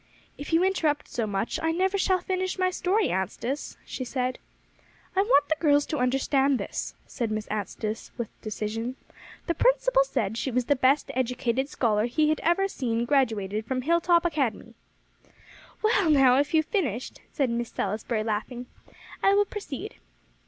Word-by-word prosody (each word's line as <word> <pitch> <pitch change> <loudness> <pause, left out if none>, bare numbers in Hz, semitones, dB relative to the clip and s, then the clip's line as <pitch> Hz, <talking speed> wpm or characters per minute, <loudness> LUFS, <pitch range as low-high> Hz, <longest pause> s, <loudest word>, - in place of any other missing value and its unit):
"If 290 - -8
you 330 +2 +4
interrupt 320 -6 +1
so 230 -3 -2
much, 205 +2 -2
I 325 - +1
never 375 +4 +1
shall 375 -1 +2
finish 370 0 -2
my 370 0 +1
story, 380 +4 +1
Anstice," 230 +9 -3
she 260 - -5
said. 255 0 -2 0.8
"I 385 - +4
want 390 -9 +4
the 315 - +1
girls 290 -2 +4
to 305 - -3
understand 270 +2 +2
this," - - -5
said 235 -3 -3
Miss 215 0 -2
Anstice 215 +1 -4
with 235 -3 -3
decision. 220 +3 -4 0.5
"The 340 - 0
principal - - +3
said 225 - -2
she 265 - -1
was 250 -1 0
the 285 - +3
best 275 +2 +2
educated 250 +1 -1
scholar 220 -4 +1
he 300 +5 +2
had 310 - +1
ever 345 +4 +2
seen 235 -9 -2
graduated 220 -6 0
from 255 -1 -2
Hilltop 340 +2 +3
Academy." 285 -9 -1 1.1
"Well, 410 -5 +3
now 270 -3 +6
if 290 +3 0
you 315 - +5
have - - -33
finished," 260 - -2
said 270 -5 0
Miss 235 0 -2
Salisbury, 215 +2 -2
laughing, 225 +3 -3 0.6
"I 390 - +4
will 410 0 +4
proceed. 405 - -7
270 Hz, 165 wpm, -27 LUFS, 235-340 Hz, 1.1 s, now